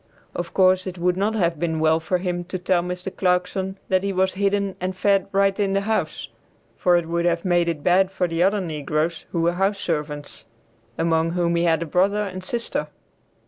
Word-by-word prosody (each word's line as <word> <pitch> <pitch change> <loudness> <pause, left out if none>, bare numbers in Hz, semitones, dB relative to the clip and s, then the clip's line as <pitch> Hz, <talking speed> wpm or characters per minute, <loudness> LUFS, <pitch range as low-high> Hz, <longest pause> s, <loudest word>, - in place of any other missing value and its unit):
Of 175 -1 -4
course 185 0 +4
it 185 0 -5
would 180 +1 +1
not 205 +4 0
have 170 -6 0
been 160 -1 -1
well 160 0 +3
for 180 +3 -1
him 175 -1 -3
to 185 +1 -4
tell 180 0 +1
Mr. 180 +1 -5
Clarkson 190 +1 0
that 185 -1 +3
he 200 0 -1
was 190 0 +1
hidden 200 0 0
and 185 0 -3
fed 195 0 +2
right 195 +1 +2
in 195 -1 +1
the 195 - +2
house, 220 +2 -2 0.5
for 175 -1 +3
it 170 -1 -2
would 170 +1 -1
have 170 0 0
made 175 -2 +2
it 155 -3 -4
bad 185 +1 +4
for 190 -2 -1
the 165 0 -2
other 200 +3 +3
negroes 155 0 -2
who 170 - -1
were 170 +1 +3
house 195 +3 +1
servants, 150 - -4 0.5
among 165 0 +1
whom 170 -1 +1
he 170 0 +2
had 165 -1 +2
a - - -5
brother 195 +6 +1
and 185 -2 -6
sister. 235 +5 -3
180 Hz, 210 wpm, -23 LUFS, 170-195 Hz, 0.5 s, course